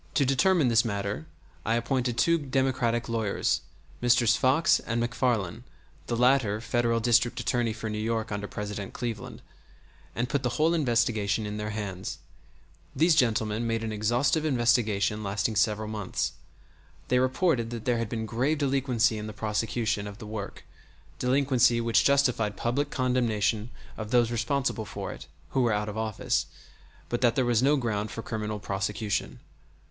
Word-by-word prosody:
To 140 - +3
determine 145 +2 +3
this 115 0 +4
matter 100 -7 -3 0.4
I 115 - +1
appointed 120 0 -1
two 170 0 +3
Democratic 130 -4 0
lawyers, 110 -4 0 0.4
Messrs. 120 -1 +4
Fox 130 +8 +3
and 115 0 -2
MacFarlane 120 -4 -1 0.4
(the 120 - -1
latter 125 -4 +3
Federal 115 0 0
District 120 +1 +2
Attorney 120 -2 0
for 110 0 -5
New 105 0 -3
York 110 0 -2
under 105 0 -3
President 105 -1 -5
Cleveland), 115 -4 -5 0.7
and 120 +1 -1
put 140 +2 -1
the 125 -2 -2
whole 160 +2 +3
investigation 115 -7 +1
in 105 0 -4
their 105 0 -3
hands. 100 -4 -5 0.8
These 165 +2 +4
gentlemen 115 -5 +1
made 115 0 -1
an 110 - -3
exhaustive 120 +8 +1
investigation 115 -6 +2
lasting 100 +2 -1
several 105 0 +1
months. 105 -2 -2 0.8
They 125 - +3
reported 130 -2 +1
that 115 -2 -6
there 120 -2 +1
had 115 -2 -2
been 110 -1 -3
grave 130 +8 0
delinquency 130 -5 +1
in 105 - -5
the 110 - -7
prosecution 105 0 -1
of 100 -1 -8
the 110 - -9
work, 105 -1 -6 0.6
delinquency 125 -2 +3
which 115 -1 +3
justified 125 -7 +2
public 140 +5 -1
condemnation 115 -4 0 0.3
of 110 0 -5
those 120 -1 +3
responsible 120 0 -1
for - - -6
it - - -10 0.2
(who 130 - +1
were 120 -2 +2
out 105 0 -1
of 105 - -6
office), 110 -1 -1 0.6
but 120 - -2
that 120 -2 +3
there 130 - +2
was 120 -2 +2
no 145 +3 +4
ground 110 -4 -2
for 115 - -6
criminal 110 -2 -3
prosecution. 100 +1 -2
115 Hz, 160 wpm, -27 LUFS, 105-125 Hz, 0.8 s, this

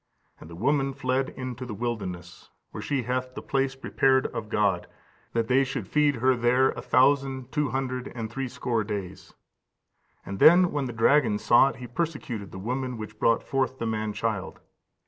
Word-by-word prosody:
And 80 - -12
the 85 - -9
woman 135 - +1
fled 130 0 0
into 130 -1 -6
the 120 -4 -6
wilderness, 95 -7 -5 0.2
where - - -6
she 140 -3 -1
hath 130 +1 -3
the - - -5
place 135 0 0
prepared 135 0 +2
of 110 -2 -5
God, 100 -5 +1 0.5
that 115 -1 0
they 130 +3 +4
should 130 -6 -4
feed 150 +2 +2
her 130 +2 +3
there 125 +2 +3
a - - -7
thousand 130 +1 +2
two 150 -3 0
hundred 130 -1 -3
and 115 -2 -3
threescore 120 -2 -2
days. 100 -3 -6 0.9
And 100 0 -6
then 175 +2 +7
when 145 -2 -1
the 125 - -4
dragon 115 -1 +3
saw 120 +5 +5
it, - - -8
he 125 - -8
persecuted 125 - -4
the - - -8
woman 125 +5 -3
which 105 0 -8
brought 115 0 +3
forth 130 -1 -1
the 115 - -3
man 110 -1 -2
child. 105 -2 -3
125 Hz, 180 wpm, -26 LUFS, 110-135 Hz, 0.9 s, then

